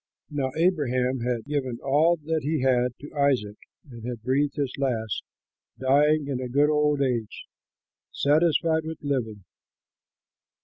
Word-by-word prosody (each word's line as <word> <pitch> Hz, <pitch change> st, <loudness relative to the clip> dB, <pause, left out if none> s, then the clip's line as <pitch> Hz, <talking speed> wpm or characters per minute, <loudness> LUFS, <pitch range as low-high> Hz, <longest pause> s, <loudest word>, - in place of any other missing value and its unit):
Now 140 Hz, -3 st, -1 dB
Abraham 135 Hz, -7 st, +1 dB
had 120 Hz, -1 st, -2 dB
given 135 Hz, -4 st, -2 dB
all 155 Hz, +5 st, +3 dB
that 160 Hz, +1 st, -1 dB
he 150 Hz, +1 st, -1 dB
had 125 Hz, -2 st, +2 dB
to 145 Hz, -, -10 dB
Isaac 130 Hz, -8 st, +1 dB, 0.3 s
and 120 Hz, -4 st, -11 dB
had 120 Hz, -2 st, -5 dB
breathed 140 Hz, +3 st, +1 dB
his 140 Hz, -3 st, -2 dB
last, 115 Hz, -6 st, -1 dB, 0.6 s
dying 145 Hz, +3 st, +3 dB
in 130 Hz, -3 st, -2 dB
a 125 Hz, -, -4 dB
good 145 Hz, +4 st, +3 dB
old 150 Hz, -1 st, +2 dB
age, 120 Hz, -5 st, -2 dB, 0.7 s
satisfied 160 Hz, +2 st, +2 dB
with 160 Hz, 0 st, -6 dB
living. 115 Hz, -8 st, -2 dB
140 Hz, 135 wpm, -26 LUFS, 125-150 Hz, 0.7 s, all